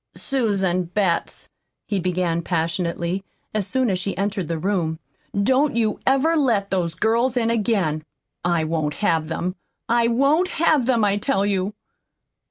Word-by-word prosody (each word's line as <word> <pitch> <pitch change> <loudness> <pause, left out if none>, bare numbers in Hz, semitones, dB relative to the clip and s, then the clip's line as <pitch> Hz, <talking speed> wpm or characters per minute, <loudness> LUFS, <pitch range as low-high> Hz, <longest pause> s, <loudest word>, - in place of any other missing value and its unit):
"Susan 195 -9 0
Betts," 180 -1 -1 0.4
he 205 -3 -1
began 175 -2 0
passionately, 170 +2 -1 0.3
as 210 -3 0
soon 260 +1 +1
as 190 -4 0
she 195 +1 -3
entered 195 -3 -1
the 165 - -2
room, 170 -2 -1 0.5
"don't 265 +5 +2
you 220 -2 +1
ever 275 +5 +3
let 230 -10 +1
those 175 -4 0
girls 230 +6 +1
in 230 -1 +2
again. 195 -9 0 0.4
I 170 -2 +1
won't 155 -2 -1
have 165 -6 +1
them. 180 +3 -3 0.3
I 235 0 +3
WON'T 275 +9 +3
HAVE 315 -7 +2
THEM, 235 -5 +3
I 200 0 +2
tell 205 -2 +1
you! 200 0 -1
200 Hz, 150 wpm, -22 LUFS, 175-235 Hz, 0.5 s, ever